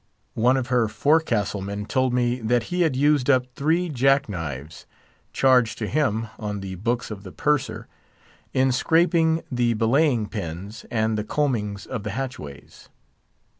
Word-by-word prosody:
One 125 +4 +3
of 125 -2 -3
her 120 -3 +2
forecastle 120 -6 +1
men 100 +1 -4
told 130 +2 +1
me 125 0 +1
that 120 +2 +1
he 180 - +1
had 160 -6 +2
used 145 -1 +2
up 130 -2 +4
three 165 +7 +1
jack 135 -1 +2
knives 80 -6 -6 0.4
(charged 125 -4 +3
to 110 - -3
him 115 -6 0
on 105 -2 -4
the 95 -1 -6
books 115 +6 -2
of 100 -2 -6
the 95 -2 -10
purser) 130 -7 -1 0.6
in 130 0 +2
scraping 165 +3 +2
the 120 -2 +1
belaying 120 0 +2
pins 100 +2 -6
and 110 -1 0
the - - -2
combings 110 -7 -1
of 125 -4 -5
the 105 -1 -5
hatchways. 100 - -7
120 Hz, 155 wpm, -24 LUFS, 105-135 Hz, 0.6 s, up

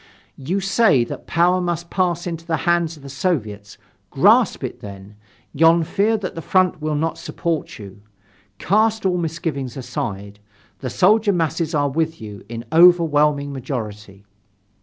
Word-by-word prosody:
"You 180 +9 -2
say 195 - +3
that - - -8
power 180 +2 +2
must 170 -1 -3
pass 175 -2 0
into 165 -2 -5
the 165 -1 -1
hands 170 -2 +1
of 145 - -17
the - - -9
Soviets, 115 - -3 0.3
grasp - - +3
it - - -5
then. 100 0 -11 0.4
Yon 165 +3 +4
fear 210 +7 +1
that 195 -3 -5
the 165 - -6
front 185 -2 +1
will 155 0 -2
not 160 +2 -2
support 165 -3 -4
you. 100 -1 -12 0.6
Cast 220 - +1
all 180 -2 +1
misgivings 155 -6 -4
aside, 100 -5 -5 0.4
the 130 - -4
soldier 205 - +3
masses 165 -1 -1
are 145 -1 +2
with 160 +3 -2
you 105 -3 -9
in 115 0 -7
overwhelming 150 -4 +4
majority." 105 -6 -7
160 Hz, 150 wpm, -20 LUFS, 130-175 Hz, 0.6 s, Yon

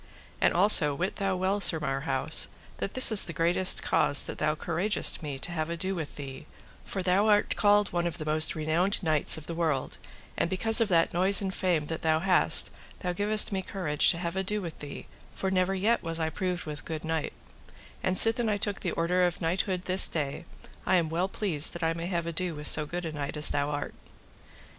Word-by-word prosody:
And - - +3
also 170 -6 +5
wit 185 +6 -4
thou 195 -1 -2
well, 190 +3 -2
Sir 165 -4 +3
Marhaus, 135 0 +2 0.3
that - - -6
this 260 -2 +7
is 215 - +8
the 170 - -7
greatest 175 +3 +2
cause 145 - +2
that - - -8
thou 155 0 -1
couragest 175 +7 +1
me 145 -3 -6
to 175 - -3
have 160 -1 -4
ado 170 +3 -4
with 160 -5 -7
thee, 135 -2 -10 0.4
for 190 - -6
thou 190 +4 +1
art 205 -1 +1
called 205 -1 +2
one 175 0 -1
of 170 0 -5
the 155 - -7
most 155 +2 +3
renowned 165 +6 -1
knights 155 -2 +2
of 155 - -10
the 170 - -7
world, 160 -5 -3 0.4
and - - -2
because 225 +5 +2
of 225 - +2
that 170 -4 +1
noise 190 +3 +5
and 190 -2 -3
fame 175 -6 -1
that 160 +1 -6
thou 160 -1 +1
hast 180 +1 +4 0.3
thou 180 -1 -3
givest 210 +4 +2
me 190 -1 -2
courage 180 -6 0
to 170 - 0
have 170 0 -5
ado 190 +2 -3
with 170 -5 -8
thee, 145 -1 -9 0.3
for 190 - -4
never 190 0 0
yet 215 +5 0
was 165 -1 -4
I 160 -1 -2
proved 180 -1 -4
with 150 -1 -8
good 160 -1 -7
knight; 160 -1 -3 0.7
and 185 0 -1
sithen 225 0 +4
I 210 - -1
took 205 -1 -3
the 175 - -4
order 180 +2 0
of 175 -1 -1
knighthood 180 +2 -2
this 185 +1 +3
day, 145 0 -5 0.4
I 185 - +1
am 170 -3 0
well 170 +4 -2
pleased 180 -7 -1
that 170 - -7
I 165 0 0
may 165 +1 -6
have 170 -2 -3
ado 170 0 -3
with 150 0 -9
so 150 -1 +3
good 175 +2 -6
a 160 - -5
knight 145 0 -6
as 150 - +3
thou 145 0 -2
art. 145 0 -5
175 Hz, 220 wpm, -27 LUFS, 155-190 Hz, 0.7 s, is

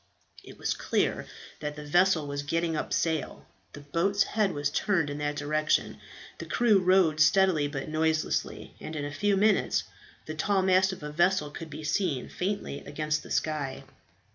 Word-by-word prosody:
It - - -13
was - - -1
clear - - -1 0.3
that 150 -1 -4
the 150 0 -8
vessel 175 0 +3
was 145 0 -3
getting 165 +3 -1
up 150 - -3
sail. 160 -3 -1 0.3
The 145 - -9
boat's 180 +8 +1
head 210 -1 0
was 145 -2 -2
turned 170 -4 +1
in 145 - -5
that 145 0 -2
direction; 155 +1 0 0.4
the - - -7
crew 230 -5 +3
rowed 180 -4 +3
steadily 160 -2 +4
but 140 -2 -5
noiselessly, 160 0 -1
and 155 - -7
in 145 -1 -3
a 145 - -5
few 205 +4 +1
minutes 205 0 +2 0.4
the 155 - -5
tall 190 +4 +1
mast 190 0 +4
of 190 - -8
a 150 - -5
vessel 170 -1 +2
could 165 +1 -8
be 155 - -8
seen 150 -4 -1
faintly 190 -6 -3
against 155 0 -2
the - - -13
sky. 145 -4 -2
155 Hz, 175 wpm, -28 LUFS, 150-190 Hz, 0.4 s, steadily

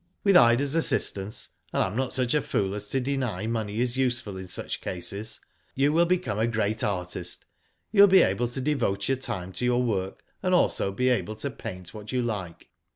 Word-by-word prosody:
With 200 -2 +4
Ida's 135 0 +5
assistance, 105 -10 +1 0.2
and - - +2
I - - +1
am 95 +2 -4
not 130 +1 -1
such 125 -2 0
a 150 - +3
fool 95 -6 -1
as 105 0 -5
to 135 - +1
deny 125 -7 -2
money 110 -2 -2
is 125 +1 0
useful 120 -6 0
in 95 0 -7
such 90 - -4
cases, 100 +5 -3 0.4
you 140 +2 +2
will 170 +2 +4
become 130 - 0
a 110 - +2
great 110 -2 -1
artist. 90 -4 -3 0.5
You 205 -2 +6
will 200 - +10
be 190 -2 +7
able 105 +6 +1
to 120 +3 -5
devote 120 -9 0
your 135 - +1
time 105 -8 -5
to 110 - -4
your 125 0 +2
work, 95 -5 -2 0.2
and 185 -1 +2
also 100 - +2
be 125 +6 +1
able 115 -3 0
to 140 +6 -3
paint 90 -7 -8
what 105 -1 -8
you 125 -1 0
like. 100 -7 -5
115 Hz, 210 wpm, -26 LUFS, 100-130 Hz, 0.5 s, will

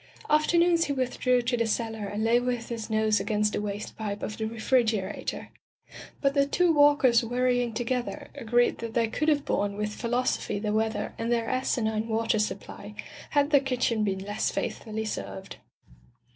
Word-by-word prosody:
Afternoons 335 +2 +4
he 285 - -1
with 255 -2 -2
drew 250 -1 +3
to 245 +1 0
the 230 -1 0
cellar 220 -2 -2
and 205 +2 -3
lay 230 +2 +4
with 245 -1 -2
his 230 -2 -5
nose 215 -1 +2
against 210 +1 0
the - - -1
waste 205 0 -5
pipe 210 -2 -4
of 215 - -3
the 220 - -3
refrigerator. 220 -3 -1 0.7
But 275 -1 +2
the 280 -1 +3
two 355 +3 +3
Walkers 290 -5 +5
worrying 245 0 +1
together, 250 +5 -3
agreed 240 -2 +1
that 230 -1 -6
they 230 -1 +3
could 305 +7 -2
have 290 -2 +2
borne 200 0 -1
with 210 0 -2
phi 235 - -5
losophy 245 -4 0
the 210 0 -2
weather 220 -1 -1
and 230 +1 -1
their 230 -1 +1
asinine 225 -4 0
water 225 0 +1
supply, 210 - -4 0.3
had 290 0 +2
their 285 -2 +6
kitchen 250 -4 0
been 195 -2 0
less 205 +1 -1
faithfully 220 0 -3
served. 100 - -6
230 Hz, 175 wpm, -27 LUFS, 215-255 Hz, 0.7 s, their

